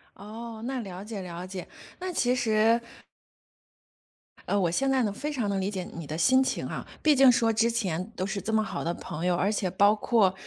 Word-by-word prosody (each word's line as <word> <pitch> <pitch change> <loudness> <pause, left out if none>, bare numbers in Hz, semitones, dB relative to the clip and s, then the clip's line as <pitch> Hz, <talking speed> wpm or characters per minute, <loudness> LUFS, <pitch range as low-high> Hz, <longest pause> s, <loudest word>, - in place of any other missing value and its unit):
哦， 220 +2 -8
那 265 0 -2
了 190 -2 -7
解 210 -2 -6
了 175 0 -6
解， 185 -1 -7 0.3
那 370 0 -3
其 250 -6 +1
实 225 -1 +3 1.7
呃， 205 - +1
我 175 - +2
现 270 +9 +1
在 265 -2 +3
呢， 205 - 0
非 295 +8 -4
常 245 -7 -1
能 195 -1 0
理 190 - -1
解 185 -2 -3
你 165 -2 -7
的 155 - -4
心 260 +9 +5
情 - - -2
啊， - - -5 0.2
毕 305 -2 +5
竟 265 -1 +7
说 230 -1 +2
之 225 +2 +3
前 190 -3 -2
都 185 - -2
是 200 0 -3
这 220 - -3
么 220 0 +3
好 190 -4 -4
的 170 - -1
朋 160 0 -6
友， 180 -1 +2
而 195 +4 +1
且 200 -3 -1
包 200 +3 +4
括 210 -3 +3
210 Hz, 235 characters per minute, -27 LUFS, 185-235 Hz, 1.7 s, 竟